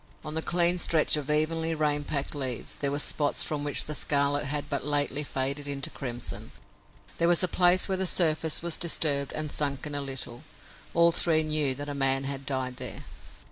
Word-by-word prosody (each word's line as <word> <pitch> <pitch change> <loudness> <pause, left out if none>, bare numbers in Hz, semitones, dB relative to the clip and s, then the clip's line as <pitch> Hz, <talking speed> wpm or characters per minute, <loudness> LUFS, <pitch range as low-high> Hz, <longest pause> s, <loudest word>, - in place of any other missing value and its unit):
On 155 - -7
the 160 - -3
clean 175 +1 0
stretch 160 -3 +2
of 150 -1 -5
evenly 160 +2 -1
rain 150 -1 -1
packed 140 -1 -4
leaves 130 -5 -3
there 140 - -1
were 140 - -3
spots 145 0 +3
from 150 -2 -3
which 145 -2 +2
the 150 - -5
scarlet 145 0 0
had 145 +1 -4
but 140 - -3
lately 145 0 +1
faded 140 +1 -2
into 140 -1 -2
crimson. 120 -5 -4 0.7
There 170 - +2
was 175 +1 +5
a - - +2
place 180 +1 +3
where 190 -1 -2
the 190 - +3
surface 160 -2 +3
was 170 -2 +4
disturbed 145 -5 +2
and 155 -1 -4
sunken 145 0 -2
a 145 - -3
little. 130 -3 -5 0.5
All 170 0 +4
three 160 -1 +3
knew 155 -4 -1
that 145 +2 -7
a 145 - -5
man 135 -1 +1
had 135 0 -6
died 130 -2 -3
there. - - -7
145 Hz, 195 wpm, -26 LUFS, 140-160 Hz, 0.7 s, was